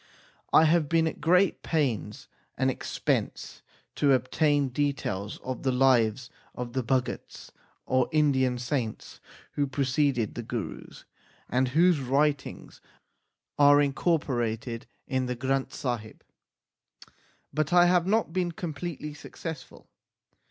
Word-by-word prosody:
I 160 - +6
have 155 -2 +2
been 165 -1 +3
at 160 - -4
great 180 +4 +3
pains 135 -6 -2 0.3
and 130 0 +2
expense - - -3 0.3
to 140 -2 +3
obtain 145 +2 +1
details 125 -7 -2
of 130 -2 -4
the 130 - +1
lives 125 -2 +2 0.2
of 120 -1 -6
the 130 - 0
Bhagats, 125 +1 -3 0.3
or 130 -1 +1
Indian 130 -5 +2
saints, 120 -3 -4 0.3
who 145 -1 -1
preceded 135 -4 0
the 120 - -5
Gurus, 120 -2 -6 0.4
and 130 +1 +1
whose 165 +4 +3
writings 140 +2 -1 0.8
are 145 0 +7
incorporated 125 -6 -1 0.2
in 130 -2 -1
the 125 - -2
Granth 135 +2 -1
Sahib, 120 -6 -5 1.3
but 155 0 -1
I 175 0 +6
have 175 0 +3
not 215 -4 +1
been 175 -2 -1
completely 160 -2 -5
successful. 150 -2 -9
135 Hz, 115 wpm, -27 LUFS, 125-155 Hz, 1.3 s, are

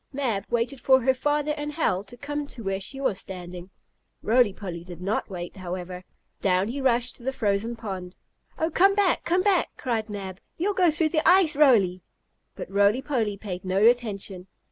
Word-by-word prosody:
Mab 240 -8 -2
waited 240 +2 -1
for 260 +1 +5
her 260 +2 +3
father 295 +3 0
and 295 0 -5
Hal 195 - 0
to 245 - -11
come 290 +2 -4
to 240 -4 -9
where 195 -1 -1
she 270 +8 -4
was 220 -8 0
standing. 180 -1 -8 0.5
Roly 235 -1 +4
Poly 180 -4 -7
did 175 -2 -10
not 195 +5 -2
wait, 175 -1 -7
however. 180 0 -6 0.4
Down 190 +1 +1
he 275 +4 -4
rushed 245 -1 +1
to 240 - -16
the 265 - -1
frozen 220 -1 -1
pond. 190 -5 -6 0.4
"Oh, 320 +1 0
come 390 +5 +4
back! 400 -3 +2
Come 360 +2 +2
back!" 390 -4 +3
cried 225 -4 -2
Mab. 190 -2 -6 0.2
"You'll 395 +5 0
go 365 -3 +4
through 315 0 +1
the 310 -1 +1
ice, 360 -4 +5
Roly!" 215 -11 +4 0.5
But - - -7
Roly 205 +6 +3
Poly 225 -8 -1
paid 185 -3 -6
no 185 0 -1
attention. 205 -6 +1
230 Hz, 190 wpm, -25 LUFS, 190-285 Hz, 0.5 s, for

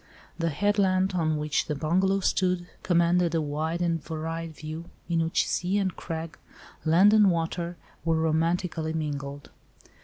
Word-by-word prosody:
The 165 0 +1
headland, 190 +1 +2
on 160 -3 +1
which 150 0 0
the 150 - -1
bungalow 185 +6 +1
stood, 180 -1 +1 0.2
commanded 170 -1 +2
a - - +3
wide 160 +3 -2
and 165 -3 0
varied 165 +1 -4
view, 155 +2 -7 0.2
in 165 -1 +1
which 165 - +1
sea 185 +3 0
and 190 -3 0
crag, 165 -1 -6 0.4
land 180 +6 +5
and 210 -2 +6
water 170 0 -2 0.3
were 165 -1 +2
romantically 160 0 0
mingled. 145 -2 -4
165 Hz, 145 wpm, -27 LUFS, 160-180 Hz, 0.4 s, and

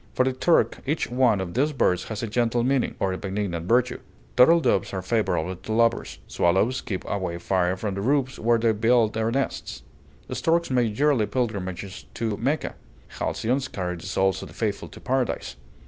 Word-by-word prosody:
For 130 - +3
the 130 - +1
Turk, 165 +6 +2
each 150 -3 -1
one 125 -5 +3
of 90 -2 -4
these 145 +4 +1
birds 90 -9 +1
has 110 0 -5
a - - -1
gentle 120 +2 +1
meaning, 135 0 +1
or 95 -1 0
a 95 - -5
benignant 95 -4 -3
virtue: 125 +3 +2 0.4
turtle 165 +7 +7
doves 100 - +1
are 95 -1 -3
favorable 95 -4 0
to 95 +5 -8
lovers, 115 +1 +1
swallows 95 +9 +1
keep 95 -3 -5
away 90 -4 -2
fire 90 +1 0
from 100 +1 -3
the 100 - -3
roofs 135 +3 0
where 115 +1 +3
they 115 0 +2
build 115 +1 +3
their 110 0 0
nests, 135 +3 -3 0.5
storks 170 -2 +1
make 120 -4 +1
yearly 140 -8 +3
pilgrimages 100 -6 -3
to 110 -3 -1
Mecca, 140 +7 -1 0.5
halcyons 130 +4 -1
carry 90 -6 -4
the 85 - -9
souls 95 0 +1
of - - -7
the - - -15
faithful - - -2
to - - -13
Paradise. 130 -1 -1
115 Hz, 185 wpm, -25 LUFS, 95-130 Hz, 0.5 s, turtle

